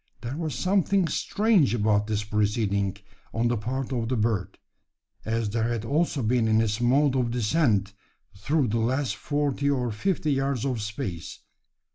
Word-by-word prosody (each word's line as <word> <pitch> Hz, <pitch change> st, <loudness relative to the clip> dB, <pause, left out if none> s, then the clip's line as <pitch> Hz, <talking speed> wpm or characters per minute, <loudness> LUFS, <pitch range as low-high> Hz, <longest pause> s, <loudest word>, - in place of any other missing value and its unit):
There 120 Hz, +3 st, -4 dB
was 155 Hz, -4 st, -3 dB
something 190 Hz, +4 st, +2 dB
strange 195 Hz, -, +2 dB
about 105 Hz, -1 st, +2 dB
this 105 Hz, -1 st, -1 dB
proceeding 105 Hz, -2 st, 0 dB, 0.4 s
on 115 Hz, +1 st, +1 dB
the 120 Hz, -, +1 dB
part 130 Hz, +5 st, -3 dB
of 115 Hz, -2 st, -2 dB
the 130 Hz, -, +1 dB
bird 105 Hz, -4 st, -1 dB, 0.7 s
as 115 Hz, -1 st, -1 dB
there 115 Hz, +1 st, 0 dB
had 115 Hz, -2 st, -2 dB
also 145 Hz, 0 st, 0 dB
been 115 Hz, 0 st, +2 dB
in 110 Hz, 0 st, +3 dB
its 110 Hz, 0 st, 0 dB
mode 135 Hz, +3 st, +3 dB
of 125 Hz, -2 st, +1 dB
descent 115 Hz, -, +1 dB, 0.4 s
through 135 Hz, +6 st, 0 dB
the 115 Hz, +2 st, 0 dB
last 125 Hz, 0 st, 0 dB
forty 145 Hz, +2 st, -1 dB
or 125 Hz, -4 st, 0 dB
fifty 155 Hz, -, -1 dB
yards 135 Hz, -2 st, -1 dB
of 125 Hz, -5 st, -1 dB
space. 105 Hz, -5 st, -5 dB
120 Hz, 160 wpm, -26 LUFS, 105-140 Hz, 0.7 s, in